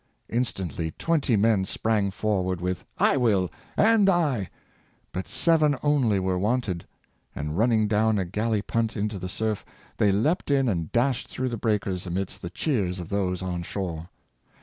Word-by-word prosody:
Instantly 95 - -2
twenty 155 -8 +1
men 105 -1 +3
sprang 105 +1 0
for 100 0 0
ward 90 -1 -2
with 90 0 -3
" - - -42 0.2
I - - +1
will," 100 -8 +2 0.2
" - - -27
and 215 -3 +5
I." 145 - +1 0.6
But 95 - -4
seven 155 -4 +3
only 135 -8 +3
were 95 -1 0
wanted; 105 -4 -1 0.5
and 75 +1 -3
running 110 +1 +3
down 110 +1 +2
a 95 - 0
galley 105 +3 -1
punt 115 0 -1
into 105 -1 -2
the 90 +1 -5
surf, 110 +1 -2 0.3
they 105 - +4
leaped 145 - +1
in 135 -2 +3
and 85 -8 -1
dashed 125 +1 +1
through 130 0 -3
the 120 - -3
breakers, 100 -5 -1
amidst 95 +2 -3
the 85 - -5
cheers 95 - -1
of 85 - -7
those 95 -2 -1
on 90 -1 -2
shore. 85 -2 -4
105 Hz, 170 wpm, -26 LUFS, 95-120 Hz, 0.6 s, and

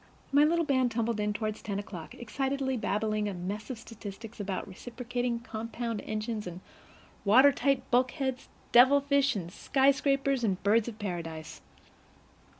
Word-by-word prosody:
My 285 +1 +6
little 335 +2 +3
band 260 -3 +2
tumbled 230 -1 -1
in 210 0 +1
toward 215 +1 -2
ten 200 -2 -4
o'clock, 200 -5 -7
excitedly 265 +3 -2
babbling 215 -1 0
a 195 - -5
mess 200 +6 -5
of 255 - -4
statistics 225 0 -9
about 195 -2 -3
reciprocating 245 +3 -3
compound 230 -1 -4
engines 215 -1 -3
and 175 0 -7 0.6
watertight 265 +4 +5
bulkheads, 260 +1 0 0.2
devil 260 +4 +7
fish 280 -2 +2
and 175 -3 -5
sky 270 0 +3
scrapers 275 -2 +1
and 195 -4 0
birds 215 +3 +3
of 225 -3 -6
paradise. 165 -6 -5
230 Hz, 145 wpm, -30 LUFS, 205-265 Hz, 0.6 s, devil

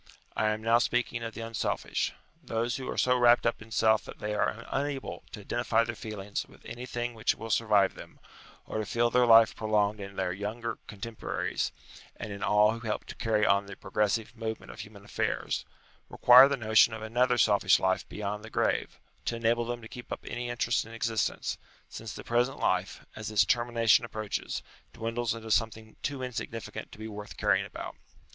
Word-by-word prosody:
I 110 - +1
am 110 0 -2
now 115 +1 +5
speaking 120 -1 0
of 115 -1 -5
the - - -6
unselfish. 115 0 -1 0.3
Those 120 -1 -1
who 130 - -6
are - - -4
so 125 0 +3
wrapped 120 0 +5
up 115 - 0
in 110 - -12
self 110 -1 +3
that - - -10
they 105 0 -3
are 110 +2 -1
unable 140 0 -3
to 105 - -8
identify 115 +1 +1
their 115 0 -3
feelings 105 -3 -5
with - - -19
anything 120 0 -4
which 110 -1 +1
will 115 0 -6
survive 105 -3 +3
them, - - -12 0.5
or - - -4
to 110 - -2
feel 120 +1 +1
their 125 0 +4
life 115 -1 +7
prolonged 105 -1 +1
in 100 0 -8
their 90 -1 -1
younger 110 +4 -4
cotemporaries 110 +2 -3 0.4
and 105 - -6
in 100 - -8
all 105 +1 +4
who 115 - -5
help 110 -2 -3
to - - -9
carry 110 -2 +1
on 100 0 +3
the 100 - -8
progressive 105 +1 -1
movement 110 -1 -5
of - - -13
human 100 -1 -10
affairs, - - -2 0.4
require 125 +2 +8
the 140 - 0
notion 110 -1 +4
of 110 - -8
another 125 +3 +2
selfish 105 -3 +4
life 95 0 0
beyond 105 0 -4
the 110 - -9
grave, - - 0 0.3
to 120 - -1
enable 115 +1 +1
them 120 0 -4
to - - -8
keep 125 +2 -10
up - - -5
any 120 0 -4
interest 120 0 +1
in 115 +1 -11
ex 115 0 -1
istence, 110 - -1 0.3
since 110 -1 -7
the - - -8
present 120 +3 +1
life, 95 +1 -1
as 110 -1 -5
its 105 -1 +4
termination 120 -2 +3
ap 120 - -8
proaches, 110 -2 -3 0.3
dwindles 115 0 -2
into 110 -1 -7
something 110 0 0
too 140 -2 -3
insignificant 115 -3 -5
to - - -12
be 110 +1 -6
worth 105 -1 -8
caring - - +2
about. - - -7
115 Hz, 195 wpm, -29 LUFS, 105-120 Hz, 0.5 s, require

